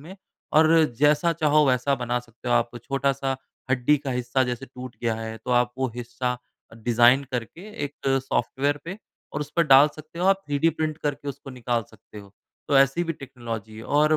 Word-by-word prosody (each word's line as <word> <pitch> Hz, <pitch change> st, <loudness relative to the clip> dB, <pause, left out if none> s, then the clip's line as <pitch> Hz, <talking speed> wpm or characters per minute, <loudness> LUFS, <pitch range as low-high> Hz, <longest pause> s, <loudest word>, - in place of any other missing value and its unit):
में, 175 Hz, +7 st, -11 dB, 0.4 s
और 155 Hz, +1 st, +6 dB, 0.3 s
जैसा 150 Hz, +3 st, +4 dB
चाहो, 155 Hz, -2 st, +3 dB
वैसा 130 Hz, +1 st, +2 dB
बना 120 Hz, 0 st, 0 dB
सकते 120 Hz, +1 st, -10 dB
हो। 120 Hz, -, +3 dB
आप 120 Hz, 0 st, +2 dB
छोटा-सा 135 Hz, 0 st, -1 dB, 0.4 s
हड्डी 135 Hz, +3 st, +3 dB
का 140 Hz, -1 st, -5 dB
हिस्सा 125 Hz, +1 st, 0 dB
जैसे 125 Hz, +1 st, -4 dB
टूट 130 Hz, -1 st, -9 dB
गया 115 Hz, -2 st, +1 dB
है, 110 Hz, 0 st, -5 dB
तो 115 Hz, -, -7 dB
आप 120 Hz, 0 st, +3 dB
वो 130 Hz, 0 st, 0 dB
हिस्सा 125 Hz, +1 st, -3 dB, 0.4 s
डिज़ाइन 120 Hz, +4 st, +4 dB
करके 125 Hz, +6 st, -4 dB, 0.2 s
एक 145 Hz, +1 st, -6 dB, 0.3 s
सॉफ्टवेयर 135 Hz, +3 st, 0 dB
पे, 180 Hz, +4 st, -6 dB, 0.4 s
और -, -, -3 dB
उस 145 Hz, 0 st, -5 dB
पर 170 Hz, -, +5 dB
डाल 135 Hz, +1 st, +8 dB
सकते 155 Hz, +2 st, -11 dB
हो 180 Hz, -, 0 dB
आप, 195 Hz, 0 st, +3 dB
थ्रीडी 145 Hz, +3 st, +2 dB
प्रिंट 155 Hz, -1 st, -2 dB
करके 145 Hz, -1 st, -3 dB
उसको 140 Hz, 0 st, -7 dB
निकाल 120 Hz, -2 st, -1 dB
सकते 110 Hz, 0 st, -14 dB
हो। 100 Hz, -1 st, -13 dB, 0.4 s
तो 140 Hz, -, +5 dB
ऐसी 135 Hz, +6 st, +3 dB
भी 165 Hz, -, -2 dB
टेक्नोलॉज़ी 115 Hz, -6 st, -7 dB
है, 110 Hz, -, -8 dB
और 150 Hz, +2 st, +3 dB
135 Hz, 195 wpm, -25 LUFS, 120-150 Hz, 0.4 s, डाल